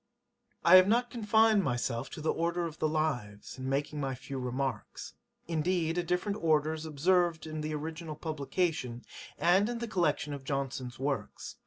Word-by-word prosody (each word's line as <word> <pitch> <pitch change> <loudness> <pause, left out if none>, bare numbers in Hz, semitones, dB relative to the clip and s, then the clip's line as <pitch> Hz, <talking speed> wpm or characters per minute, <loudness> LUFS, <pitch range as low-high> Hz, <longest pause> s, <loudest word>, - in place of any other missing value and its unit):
I 175 +2 +10
have 185 0 +7
not 240 +3 +2
confined 220 -2 +4
myself 120 -2 -1
to - - -8
the 155 - +1
order 170 +1 0
of 165 -1 -7
the 155 - +1
Lives, 130 -9 -2
in 130 0 -3
making 145 +2 -1
my 135 -1 -2
few 135 +1 -6
remarks. 130 +1 -4 0.3
Indeed 165 0 0
a 175 - +1
different 180 +4 -1
order 155 -1 +3
is 160 0 -6
observed 170 +2 +2
in 155 -1 -5
the 155 0 -3
original 160 +1 -5
publication, 150 -5 -2 0.3
and 190 +5 +4
in 240 - -2
the 235 0 -4
collection 160 -7 0
of 140 -2 -7
Johnson's 135 -2 -3
Works. 140 +1 -3
155 Hz, 170 wpm, -31 LUFS, 140-175 Hz, 0.3 s, I